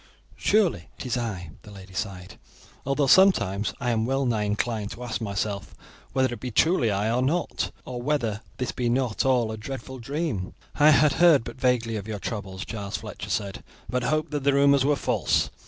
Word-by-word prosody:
"Surely 210 -5 +1
it - - -7
is 125 - -1
I," 105 -9 -4
the 105 - -14
lady 95 -2 -12
sighed, 90 -1 -5 0.5
"although 140 +1 +2
sometimes 120 - +4
I 125 -3 0
am 110 0 0
well 135 +1 +1
nigh 110 -4 +1
inclined 105 0 -1
to 125 - -9
ask 120 -1 -3
myself 100 -1 -3 0.4
whether 130 -1 +1
it - - -7
be 125 - -4
truly 145 0 +3
I 105 +2 0
or 120 +2 +1
not, 155 +7 0 0.2
or 125 -1 -5
whether 120 -6 -1 0.2
this 125 -2 -2
be 120 -1 -1
not 125 -2 0
all 125 -4 +2
a 110 - -5
dreadful 130 +3 -7
dream." 135 - -3 0.2
"I 150 +1 +5
had 150 -1 +5
heard 165 -8 +7
but 130 - -9
vaguely 120 -3 +1
of 100 0 -6
your 110 -2 -3
troubles," 95 -2 -5
Giles 100 -3 -4
Fletcher - - -8
said, 100 -2 -2 0.2
"but 125 0 -1
hoped 155 +4 0
that 145 -2 -2
the 140 0 +3
rumours 140 -1 +5
were 145 +1 +3
false. - - +1
120 Hz, 195 wpm, -26 LUFS, 105-135 Hz, 0.5 s, heard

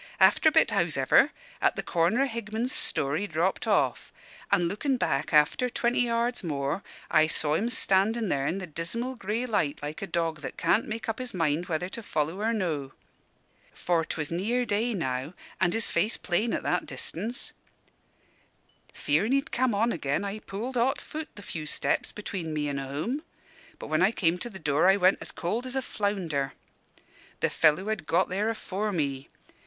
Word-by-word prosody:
After - - +6
a - - -6
bit, - - +4
hows'ever, - - +4 0.3
at - - +3
the - - -3
corner 175 +10 +2
o' - - +1
Higman's 230 +1 -3
store, 140 - 0
he 205 - -2
dropped 170 +2 0
off; - - +1 0.4
an' 175 - +3
lookin' 255 - 0
back 135 - 0
after 150 - +4
twenty 240 0 0
yards 240 -1 0
more, 145 +1 -2 0.3
I 155 0 +5
saw 150 -1 0
him 215 +9 +1
standin' 220 0 +2
there 140 -5 0
in 185 - 0
the 190 - -4
dismal 180 - -3
grey 225 +1 -2
light 205 - 0
like 150 +1 -5
a 195 - -3
dog 165 -3 -1
that 140 - -6
can't 220 - +2
make 220 +1 -4
up 225 +1 -2
his 255 -5 -5
mind 165 0 0
whether 170 0 -1
to 230 - -6
follow 160 -1 -2
or 225 +2 +1
no. 160 -11 -2 0.8
For 170 -2 +1
'twas 150 -1 -3
near 225 +9 0
day 225 +2 0
now, 130 -1 -3 0.2
an' 175 -1 +3
his 225 +4 +1
face 215 - +2
plain 210 +6 0
at - - -3
that - - 0
distance. 235 +3 -1 1.4
Fearin' 180 - +1
he'd 275 +3 +1
come 255 -4 +1
on 230 +4 +2
again, 145 0 -1
I 200 +2 -4
pulled 230 +6 -5
hot 265 +4 +2
foot 310 0 -7
the 205 - -10
few 155 -4 -5
steps - - 0
between 180 -6 -5
me 150 -1 -1
an' 140 -1 -2
home. 150 - -3 0.6
But - - -8
when 155 +2 +2
I 190 +4 +5
came 180 -5 +1
to 240 - -2
the 195 - -9
door, 155 +1 +3
I 195 - +5
went 185 0 +4 0.2
cold 225 +9 -2
as 255 - -4
a 265 - +1
flounder. 175 - -1 0.9
"The - - +2
fellow 165 +6 +3
had 215 -8 -3
got 180 +3 +2
there 200 +4 0
afore 215 -1 -2
me. 140 -6 -2
190 Hz, 185 wpm, -28 LUFS, 155-230 Hz, 1.4 s, After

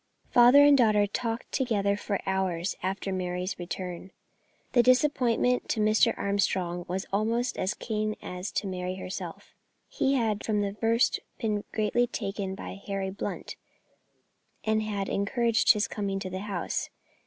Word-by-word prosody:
Father 245 +4 +8
and 290 0 +7
daughter 215 -5 +4
talked 230 +3 -3
together 205 -7 +1
for 200 -1 -2
hours 190 -2 -1
after 190 +1 -2
Mary's 180 +1 -3
return. 180 +1 -5 0.6
The 245 - +5
disappointment 250 -1 +2
to 225 - 0
Mr. 215 +2 +3
Armstrong 185 -3 0
was 185 +2 -3
almost 230 +4 0
as 190 +3 -1
keen 215 -1 -2
as 180 +2 -6
to - - -1
Mary 185 -1 -3
herself. 185 0 -7 0.3
He 275 - +1
had 220 -5 0
from 210 -2 0
the 200 -1 -2
first 230 +3 +2 0.2
been 210 -3 -1
greatly 225 +3 +1
taken 195 -4 -4
by 195 0 -8
Harry 195 -1 -2
Blunt, 195 - -5 1.1
and 220 0 +1
had 205 -2 -2
encouraged 230 +3 +3
his 210 -1 0
coming 200 -2 -3
to 185 -2 -5
the 185 - -3
house. 195 -4 -3
205 Hz, 145 wpm, -28 LUFS, 190-230 Hz, 1.1 s, Father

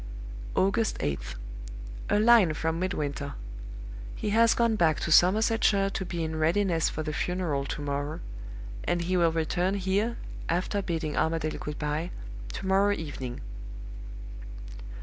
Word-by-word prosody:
"August 195 +3 +2
8th. 60 -4 -2 0.7
A 205 - +4
line 215 -8 +6
from 160 +1 -1
Midwinter. 145 -6 -2 0.8
He 210 - -2
has 230 +2 +5
gone 235 -2 +3
back 160 -6 +3
to 170 - -1
Somersetshire 200 +2 +5
to 190 - -3
be 170 -1 -3
in 160 0 -2
readiness 165 +1 +2
for 155 - -3
the 155 0 -3
funeral 165 -6 -1
to 150 - -4
morrow; 145 +1 -2 0.6
and 175 -1 0
he 185 +2 0
will 170 -2 +4
return 175 +4 +1
here 200 +4 0 0.3
(after 185 +4 +1
bidding 165 -5 -2
Armadale 160 -1 0
good 150 0 -5
by) 150 +3 -1 0.4
to - - -5
morrow 195 +2 +4
evening. 135 -7 -5
170 Hz, 135 wpm, -28 LUFS, 155-195 Hz, 0.8 s, line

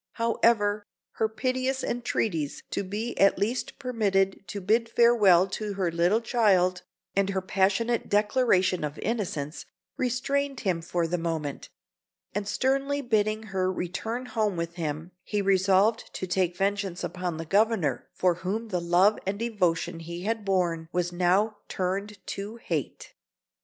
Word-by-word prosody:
However, 215 -3 +2 0.3
her 220 - +1
piteous 255 +3 -1
entreaties 200 -10 -2
to - - -1
be 210 +5 -4
at 195 - +5
least 230 +5 -2
permitted 200 -8 0
to 200 +3 -5
bid 225 +4 +1
farewell 215 -7 +5
to 210 +1 -3
her 185 -3 0
little 175 +7 +2
child, 190 -7 +2 0.3
and 195 0 +2
her 195 -1 0
passionate 200 +5 +1
declaration 205 -4 +2
of 150 0 -4
innocence, 175 -9 -3 0.3
restrained 275 +2 -1
him 180 -5 0
for 170 0 -1
the 175 +2 -1
moment; 160 -4 -3 0.6
and 205 0 -2
sternly 275 +5 0
bidding 215 -3 +1
her 185 -1 +1
return 220 +8 -3
home 215 -6 -1
with 170 0 -3
him, 160 0 -4
he 210 - -2
resolved 195 +3 +3
to - - -3
take 180 -1 0
vengeance 195 -2 -1
upon 180 -3 -3
the 165 - -5
Governor, 195 - +1
for 180 -1 +3
whom 220 +5 -3
the 180 -3 -1
love 180 +5 +4
and 195 +1 -1
devotion 180 -7 0
he 170 +2 -7
had 225 +1 -1
borne 175 -4 0
was 175 0 -1
now 185 +5 +2
turned 195 +3 -2
to 205 +3 -5
hate. 240 - -4
195 Hz, 145 wpm, -27 LUFS, 180-225 Hz, 0.6 s, at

